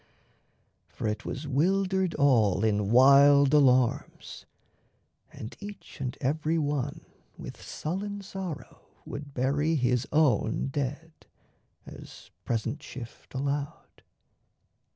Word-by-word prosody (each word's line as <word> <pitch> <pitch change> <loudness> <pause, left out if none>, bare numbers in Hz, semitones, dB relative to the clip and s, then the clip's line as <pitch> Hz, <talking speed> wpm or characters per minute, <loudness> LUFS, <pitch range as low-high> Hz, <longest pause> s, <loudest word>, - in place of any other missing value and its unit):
For - - -7
it 105 +1 -3
was 140 +3 -5
wildered 185 +5 +1
all 115 -9 +3
In 105 -2 +1
wild 140 +3 +6
alarms, 130 -4 +1 0.8
and 110 - -9
each 200 -7 -10
and 130 -2 -4
every 155 +4 0
one 145 -2 -2 0.4
With - - -9
sullen 200 +5 -5
sorrow 190 -6 -8 0.2
would 145 -1 -8
bury 145 +5 +1
his 125 -2 +1
own 135 -5 +2
dead, 145 +4 -4 0.7
As - - -12
present 115 +6 -2
shift 120 -2 -11
allowed. 140 +2 -4
140 Hz, 100 wpm, -28 LUFS, 125-155 Hz, 0.8 s, wild